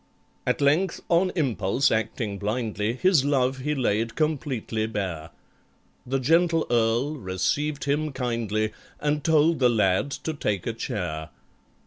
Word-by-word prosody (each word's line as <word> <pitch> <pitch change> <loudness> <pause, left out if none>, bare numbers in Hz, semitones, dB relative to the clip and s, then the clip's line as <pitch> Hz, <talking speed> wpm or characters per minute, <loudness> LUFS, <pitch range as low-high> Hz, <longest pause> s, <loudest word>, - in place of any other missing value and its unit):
At - - +1
length 160 +6 +2
on 180 +2 +3
impulse 125 - +1
acting 110 -2 -2
blindly, 105 0 -1
His 160 +2 +3
love 135 -2 +1
he 150 +3 -1
laid 115 -3 0
completely 130 -8 -1
bare; 90 -7 -4 0.8
The 135 +2 0
gentle 165 +4 +3
Earl 120 +6 +1
received 140 - -1
him 150 +2 0
kindly 115 -4 -1 0.3
And 150 0 0
told 160 0 +3
the 125 -2 +5
lad 105 +2 +2 0.2
to 160 - -1
take 105 - -2
a 115 - -1
chair. 85 -8 -4
125 Hz, 130 wpm, -25 LUFS, 110-150 Hz, 0.8 s, the